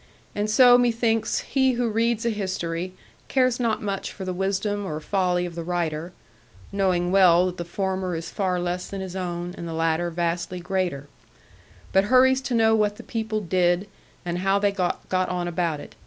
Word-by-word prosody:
And 210 +1 -1
so 245 +2 +7
methinks 230 -2 +1
he 265 -1 +1
who 240 0 0
reads 230 +1 0
a 235 - +2
history 185 -3 -3 0.3
cares 255 -2 +2
not 230 -3 0
much 200 -2 -3
for 190 - -7
the 185 - -2
wisdom 195 +2 -1
or 155 -5 -4
folly 180 +1 0
of 175 - -6
the 170 - -5
writer 170 -1 -2 0.6
(knowing 185 -3 +1
well 180 -2 +6
that 180 0 -3
the 175 - -4
former 190 0 -2
is 165 0 -5
far 185 -3 -1
less 175 +1 -3
than 195 - -5
his 190 -1 -6
own, 175 -1 -4
and 170 - -5
the 165 - -5
latter 165 +1 +1
vastly 170 +1 -2
greater), 175 -6 -2 0.9
but 195 +1 +4
hurries 260 +3 +5
to 260 -2 -2
know 225 -1 +4
what 210 -2 +2
the - - -11
people 220 -2 -3
did, 180 0 +1 0.4
and 175 0 -2
how 195 +1 +2
they 200 0 +2
got 185 -3 -1 0.2
on 180 -1 0
about 170 -3 -1
it. - - -11
185 Hz, 185 wpm, -24 LUFS, 175-215 Hz, 0.9 s, so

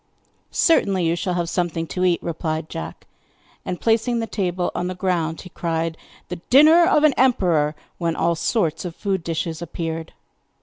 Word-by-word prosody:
'Certainly, 195 - +2
you 165 +1 +2
shall 180 +1 -2
have 175 -1 -1
something 170 -2 -1
to 180 +2 -3
eat,' 180 -2 +2
replied 160 -1 -3
Jack. 165 - -7 0.6
And, 180 -1 -4
placing 230 +1 +1
the 230 - -1
table 180 -5 -2
on 180 - -2
the 185 - -4
ground 175 -3 -1
he 180 - -11
cried: 165 -1 -2 0.3
'The 180 - -4
dinner 315 +6 +7
of 305 -5 +3
an 305 -2 +5
emperor!' 175 - +2 0.2
when 170 -2 -1
all 170 - +1
sorts 165 0 0
of 175 -2 -6
food 190 -4 -2
dishes 165 0 -3
appeared. 165 -1 -5
175 Hz, 170 wpm, -22 LUFS, 165-195 Hz, 0.6 s, dinner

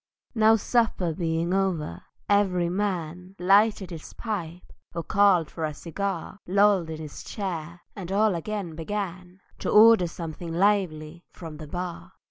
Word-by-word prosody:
Now 220 -1 +5
supper 220 -6 +1
being 165 +1 -1
over, 180 - -1 0.3
every 185 -4 +2
man 180 -1 -3
Lighted 195 +1 +3
his 160 -2 -9
pipe 180 -6 -5 0.2
or 170 - -2
called 195 -2 +3
for 165 - -5
a 155 -1 -2
cigar, 190 +4 -4
Lolled 195 -2 +3
in 160 -1 -5
his 155 -2 -8
chair—and 175 -1 -6
all 210 +1 +3
again 180 0 -4
began 180 +1 -5 0.2
To - - -3
order 215 -3 +7
"something 165 0 -7
lively" 175 -4 0
from 160 -3 -9
the 155 0 -9
bar. 175 +2 -6
180 Hz, 135 wpm, -26 LUFS, 165-200 Hz, 0.3 s, order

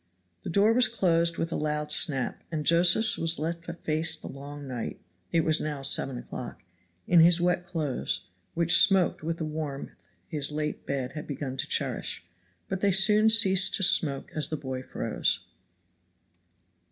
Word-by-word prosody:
The - - -7
door 200 +6 +3
was 250 +1 +4
closed 170 -6 0
with 165 0 -3
a - - -3
loud 150 0 -3
snap, 135 -4 +1
and 155 -2 -4
Josephs 175 +7 +3
was 165 +1 +1
left 170 +3 -5
to 170 - -6
face 160 -1 0
the - - -10
long 140 +1 -10
night 125 -3 -6 0.3
(it 165 - +2
was 155 0 +2
now 150 -3 -5
seven 135 -1 +1
o'clock) 120 - -9 0.4
in 175 - +4
his 170 +1 +5
wet 180 0 0
clothes, 155 - -3 0.3
which 170 0 +5
smoked 190 -3 +3
with 165 +1 -4
the 160 - -4
warmth 150 -3 -6 0.4
his 150 -3 -1
late 150 0 -5
bed 135 -2 -3
had 150 +1 -8
begun 140 -2 -5
to - - -4
cherish; 85 - -3 0.4
but 190 -1 -4
they 200 - +2
soon 210 +3 +5
ceased 195 -4 +5
to 195 - 0
smoke 145 -6 +2
as 155 -1 -3
the 155 - -3
boy 130 -2 -6
froze. - - -2
160 Hz, 170 wpm, -27 LUFS, 145-175 Hz, 0.4 s, his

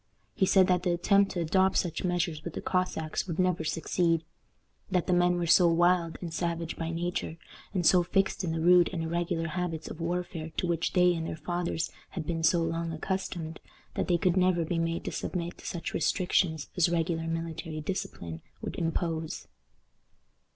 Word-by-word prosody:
He 190 - +2
said 190 -1 +6
that 180 -1 +2
the 180 - 0
attempt 195 +3 +3
to 175 - -1
adopt 190 +4 +3
such 170 -2 -1
measures 175 -4 -1
with 170 - -6
the - - -2
Cossacks 180 -3 -1
would 170 -3 -3
never 180 -3 +1
succeed; 165 +1 +1 0.7
that 180 -2 +1
the 185 - +1
men 175 0 +4
were 175 - 0
so 175 +1 +6
wild 170 0 +3
and 170 -3 -5
savage 170 -1 -2
by 165 0 -3
nature, 170 0 -3 0.3
and 185 -4 -1
so 180 +2 +6
fixed 195 +2 0
in 170 - -1
the 160 - -1
rude 175 +1 +6
and 170 -3 -3
irregular 170 0 -1
habits 165 -2 -3
of 165 - -8
warfare 170 -1 -3
to - - +1
which 170 -1 0
they 180 -1 +5
and 165 -1 -3
their - - -4
fathers 175 -1 -2 0.2
had 170 -5 -5
been 165 +1 -2
so 165 +1 +3
long 165 0 -2
accustomed, 165 -1 -3 0.3
that - - -1
they 175 - +3
could 180 +1 +2
never 180 -2 +3
be 165 +1 -1
made 165 0 -1
to - - -2
submit 175 -1 -4
to - - -9
such 170 - -4
restrictions 165 -2 +1
as 180 -2 +4
a - - -3
regular 165 -1 0
military 165 -1 -4
discipline 85 - -5 0.2
would - - -5
impose. 165 -1 -2
170 Hz, 190 wpm, -29 LUFS, 165-180 Hz, 0.7 s, said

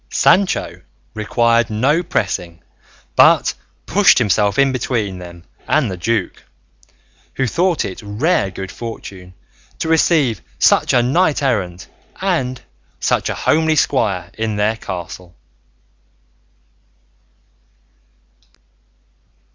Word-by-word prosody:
Sancho 195 0 +1 0.3
required 115 +1 +1
no 135 +10 +1
pressing, 85 - -3 0.5
but - - +5 0.3
pushed - - +4
himself 100 0 +1
in 140 -1 +4
between 110 -7 -2
them 85 -1 -11 0.2
and 135 -9 +1
the 90 - -5
duke, 110 +2 -2 0.9
who 135 - 0
thought 170 +6 0
it 95 - -7
rare 105 - 0
good 95 0 -7
fortune 95 -6 -9 0.4
to - - -3
receive 160 - +2 0.2
such - - +3
a 125 -1 +3
knight 150 +3 +1
errant 95 -8 -2 0.3
and 135 -10 -1 0.4
such - - 0
a - - -2
homely 160 0 +1
squire 100 - 0
in 110 -1 -2
their 105 +2 +1
castle. 90 -3 -8
115 Hz, 100 wpm, -18 LUFS, 95-140 Hz, 0.9 s, but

